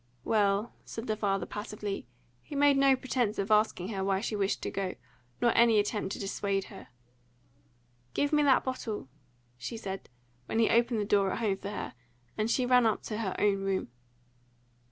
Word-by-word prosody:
"Well," 205 - +1
said 225 - -7
the 215 - 0
father 195 -3 0
passively. 210 - -5 0.3
He 290 - -9
made 285 0 +5
no 275 -1 +5
pretence 250 -4 -1
of 200 +2 -2
asking 210 -3 +2
her 195 -3 -2
why 195 0 +1
she 215 +1 -3
wished 200 -1 0
to - - -2
go, 190 -2 -3 0.4
nor 240 -1 +3
any 230 -2 +6
attempt 205 -1 0
to - - -6
dissuade 195 0 -1
her. - - -11 1.3
"Give 285 +1 +1
me 300 - +5
that 275 -3 +4
bottle," 225 - -4 0.5
she 225 - -5
said, 195 -3 -6 0.4
when - - -2
he 225 -1 +4
opened 235 0 +3
the 205 - 0
door 200 -2 +3
at - - -2
home 210 -4 0
for 200 - -6
her, 205 - -5 0.4
and 215 +1 0
she 250 +1 +2
ran 250 -2 +5
up 220 - 0
to 215 -1 -4
her 195 -5 -2
own 205 -1 +3
room. 195 -7 -1
210 Hz, 185 wpm, -30 LUFS, 195-235 Hz, 1.3 s, any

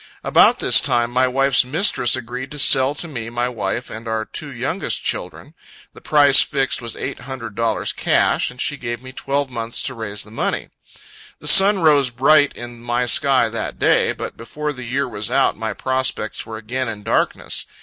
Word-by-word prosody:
About - - +4
this - - +4
time, 120 0 0
my 130 +1 +2
wife's 135 +1 +3
mistress 130 - +2
agreed 125 +3 -6
to 150 - -8
sell 135 0 +4
to 170 - -4
me 115 -7 -6
my 120 +1 -2
wife 120 0 -4
and 115 +1 -8
our 110 -1 -2
two - - -7
youngest - - -2
children. - - -4 0.4
The - - -15
price 145 -2 +5
fixed, 135 -3 -1
was 115 -1 -6
eight - - -5
hundred 125 -4 -8
dollars 115 +2 -1
cash, - - +1
and 125 - -13
she 145 - -1
gave 120 -1 -5
me 130 - -9
twelve 140 +1 -3
months 115 -1 -2
to 130 - -1
raise 105 -4 -5
the 105 - -16
money. 115 - -3 0.7
The - - -11
sun 195 -1 +6
rose 145 -4 +4
bright 140 +4 +3
in 120 -1 -9
my 120 +1 -1
sky 130 0 +3
that 115 - -5
day; - - +2
but - - -7
before 150 +6 -5
the 130 -2 -9
year 135 +4 -1
was 105 +3 -4
out, 135 +2 +2
my 110 0 -4
prospects 130 -1 -2
were 110 -1 -7
again 125 +4 -4
in 105 -2 -7
darkness. - - -1
125 Hz, 190 wpm, -20 LUFS, 115-135 Hz, 0.7 s, sun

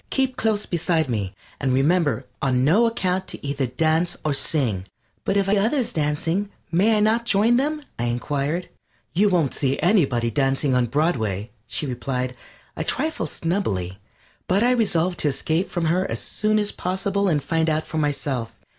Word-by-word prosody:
Keep 265 -1 0
close 220 -3 0
beside 165 -3 0
me, 100 -5 -2 0.2
and 130 -2 +1
remember 145 -3 +2 0.2
on 130 -2 +2
no 210 +11 +5
account 190 -4 -1
to - - -6
either 140 -1 -1
dance 160 +6 +1
or 150 - +2
sing." 120 - 0 0.4
"But 195 - +1
if 195 -1 +2
I 195 - +3
see - - +4
others 240 +5 +1
dancing 165 +6 0 0.2
may 205 +6 +4
I - - +2
not 225 +2 +2
join 225 +3 +4
them?" 300 +3 -1 0.2
I 120 - 0
inquired. 140 +8 -1 0.5
"You 205 +4 +4
won't 170 -8 +1
see 135 -1 0
anybody 140 - +2
dancing 135 0 +1
on 125 -1 +2
Broadway," 115 - 0 0.2
she 135 - -2
replied, 125 0 -3 0.4
a - - -2
trifle 300 - -1
snubbily, 100 - -2 0.5
but 195 +4 +3
I 245 - +4
resolved 185 -7 +1
to - - +1
escape 160 +5 0
from 175 -2 -2
her 180 +4 +1
as - - -2
soon 215 0 0
as 210 -1 +1
possible 195 +2 -1
and 150 -5 +1
find 160 -1 +1
out 155 0 0
for 160 - -3
myself. 135 -6 -2
160 Hz, 175 wpm, -23 LUFS, 135-200 Hz, 0.5 s, no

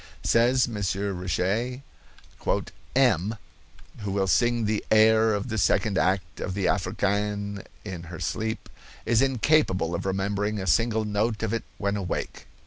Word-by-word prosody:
Says 125 +3 +3
M. 120 - -7 0.5
Richet: 105 +9 -1 1.1
"M——, 110 -6 +3 0.6
who 100 -2 -4
will 100 0 +1
sing 120 +4 +2
the 105 0 0
air 110 0 +5
of 105 +5 -3
the 110 -1 -1
second 100 +1 +2
act 90 -4 0
of 95 - -3
the 100 -2 -1
Africaine 100 +1 -1 0.2
in 95 -4 -5
her 85 0 -8
sleep, 110 +7 -3 0.4
is 115 +1 +3
incapable 130 - +2
of 85 - -3
remembering 100 +2 -1
a 95 - -3
single 110 - +2
note 105 +2 -1
of 110 0 -1
it 115 - -2
when 100 0 -1
awake." 95 -4 -4
105 Hz, 140 wpm, -26 LUFS, 95-115 Hz, 1.1 s, air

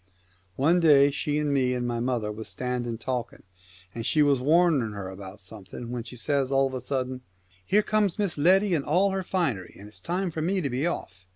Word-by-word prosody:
One 160 - +3
day 145 -4 +6
she 150 +1 -1
and 150 -1 0
me 130 -2 +1
and 120 -1 -2
my 120 -1 -2
mother 120 -3 -1
was 110 +1 -8
standing 125 -2 -3
talking, 120 0 -4 0.5
and 115 - -5
she 150 +5 +3
was 140 -2 +3
warning 150 -5 +3
her 100 -2 -6
about 95 +1 -10
something, 105 +4 -9
when 125 -1 -3
she 125 - -10
says 135 +2 -1
of 135 -1 +2
a 130 - -3
sudden, 130 0 -3 0.2
" 95 0 -33
Here 210 +2 +3
comes 210 -4 +1
Miss 200 -5 -1
Letty 185 +6 +4
in 150 -4 +1
all 185 +7 +2
her 190 0 -1
finery, 165 - -2
and 100 - -11
it's 105 -2 -11
time 180 - -2
for 160 - -4
me 190 +4 0
to 140 -7 -2
be 130 +7 0
off.' 95 - -6
135 Hz, 215 wpm, -26 LUFS, 115-165 Hz, 0.5 s, day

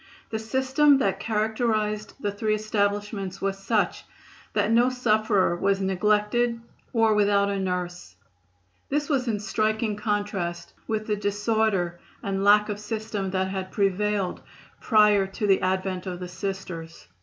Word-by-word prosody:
The 220 - -2
system 265 +5 +3
that 195 -7 0
characterized 215 0 -1
the 205 - -1
three 215 +1 0
establishments 205 -2 -2
was 195 0 -2
such 210 +1 0 0.5
that - - +1
no 240 +2 +5
sufferer 215 -7 +2
was 195 +2 +1
neglected 210 +5 +1 0.3
or 225 -2 +3
without 200 -1 +3
a 200 - -1
nurse. 180 - -4 0.7
This 295 +1 -1
was 265 -4 +1
in 215 -3 0
striking 215 +1 0
contrast 205 -5 -3
with 215 -1 -2
the 210 - 0
disorder 205 -3 0 0.2
and 195 0 -1
lack 210 +1 +6
of 205 -1 -4
system 215 -2 -3
that 190 0 -1
had 190 -1 -4
prevailed 200 -1 0 0.4
prior 210 -3 +4
to 200 +3 -4
the 195 -2 +4
advent 185 0 -1
of 180 -1 -4
the 180 - -5
Sisters. 180 - -6
205 Hz, 140 wpm, -25 LUFS, 195-220 Hz, 0.7 s, lack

